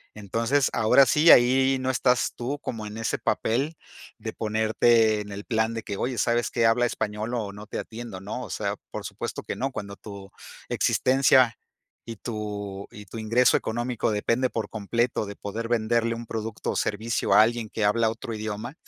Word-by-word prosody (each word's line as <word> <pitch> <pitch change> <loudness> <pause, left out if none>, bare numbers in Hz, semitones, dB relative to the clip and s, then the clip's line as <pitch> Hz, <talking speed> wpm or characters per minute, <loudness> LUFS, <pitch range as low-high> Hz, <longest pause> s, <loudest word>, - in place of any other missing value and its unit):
Entonces, 115 +7 0
ahora 120 +5 +5
sí, 150 +5 +4
ahí 130 +2 +5
no 130 0 0
estás 125 -1 +1
tú 130 +4 -3
como 110 -6 -5
en 105 +1 -8
ese 115 - -2
papel, 140 +8 0 0.4
de - - -6
ponerte 110 0 +2
en 105 0 -8
el 100 +1 -7
plan 110 0 0
de 115 - -4
que: 100 - -5
"Oye, 125 +3 -2
¿sabes 120 0 +1
qué?, 115 -2 +1
habla 120 +2 +4
español 110 +1 -3
o 105 -4 -3
no 105 +1 -10
te - - -5
atiendo" 115 -4 -7
¿no?, 100 +3 -5
o - - -8
sea, - - -2
por - - -6
supuesto - - -5
que - - -4
no, 135 +1 -2
cuando 100 -5 -6
tu 100 -2 -10 0.4
existencia 130 -2 +3 0.5
y 115 - -6
tu 105 -3 -5
y 105 -3 -11
tu 115 +4 -8
ingreso 115 +3 +3
económico 120 +1 -1
depende 115 +5 +1
por 115 -2 -3
completo 115 +1 -1
de 100 - -7
poder 110 +4 -5
venderle 115 0 +1
un 115 +1 -7
producto 110 -1 -4
o - - -4
servicio 110 0 0
a 105 +2 +8
alguien 115 -1 -1
que 110 - -1
habla 110 +2 +3
otro 115 +1 -6
idioma, 110 +3 -5
115 Hz, 190 wpm, -26 LUFS, 105-120 Hz, 0.5 s, a